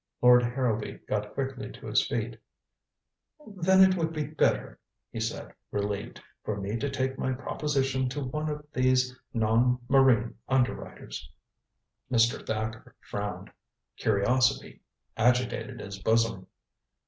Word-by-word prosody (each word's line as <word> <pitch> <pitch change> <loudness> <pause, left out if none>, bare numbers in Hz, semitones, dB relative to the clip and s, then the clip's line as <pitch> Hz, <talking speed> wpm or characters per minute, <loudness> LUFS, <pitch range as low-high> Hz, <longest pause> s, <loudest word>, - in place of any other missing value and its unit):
Lord 125 0 +7
Harrowby 120 -3 -1
got 105 0 -2
quickly 135 -1 -3
to - - -12
his - - +2
feet - - -3 1.1
"Then 190 -1 +4
it 190 0 +5
would 165 -2 -1
be 155 -2 -2
better," - - 0 0.3
he - - -5
said, - - -4 0.2
relieved, 100 0 -3 0.2
"for 105 -1 -3
me 100 +2 -3
to 140 +4 -2
take 130 -1 -2
my 130 - 0
proposition 135 -1 -1
to 145 +2 -4
one 150 +4 -2
of 150 0 -5
these 130 0 +2 0.2
non 115 +2 +3
marine 130 -5 +4
underwriters." 125 - -2 0.8
Mr. 115 -1 +3
Thacker 110 0 -4
frowned. 105 -1 -5 0.4
Curiosity 125 +5 +1 0.4
agitated 125 +2 +1
his 100 -1 -7
bosom. 110 -2 +1
125 Hz, 125 wpm, -28 LUFS, 110-135 Hz, 1.1 s, Lord